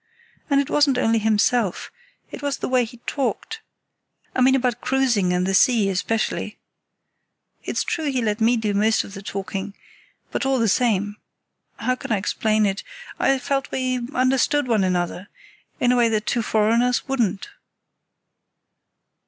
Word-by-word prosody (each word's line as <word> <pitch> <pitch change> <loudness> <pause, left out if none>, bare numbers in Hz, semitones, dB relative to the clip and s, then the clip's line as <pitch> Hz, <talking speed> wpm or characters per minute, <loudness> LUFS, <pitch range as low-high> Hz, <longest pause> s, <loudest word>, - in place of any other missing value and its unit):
And 280 -1 +3
it 280 - 0
wasn't 285 -3 +3
only 225 -2 +2
himself, 220 -1 +1 0.4
it - - -8
was 285 -1 -2
the - - -4
way 255 -2 +2
he 245 +2 -12
talked—I 290 - -6
mean 260 +1 +5
about 245 -2 0
cruising 240 -9 +1
and 180 0 +1
the 195 - -1
sea, 215 0 +4
especially. 210 +2 -2 1.1
It's - - -1
true 320 - -2
he 260 - 0
let 220 -1 -1
me 235 +2 +4
do 215 -2 -1
most 215 +2 +2
of 195 - -11
the 195 - -8
talking; 195 0 -5 0.6
but, - - -2
all 270 0 +1
the 230 -2 +2
same—how 210 +3 -2
can - - -7
I 215 - +3
explain 215 +2 +1
it? 195 0 -1 0.4
I 270 - +3
felt 270 +1 -2
we 255 -1 -1 0.2
understood 260 +2 +2
one 220 -5 +2
another, 180 +1 -2 0.5
in 245 - +3
a 250 - +2
way 235 -1 +4
that 215 -1 -1
two 240 - 0
foreigners 230 +4 +1
wouldn't. 230 - -1
230 Hz, 155 wpm, -22 LUFS, 205-255 Hz, 1.1 s, mean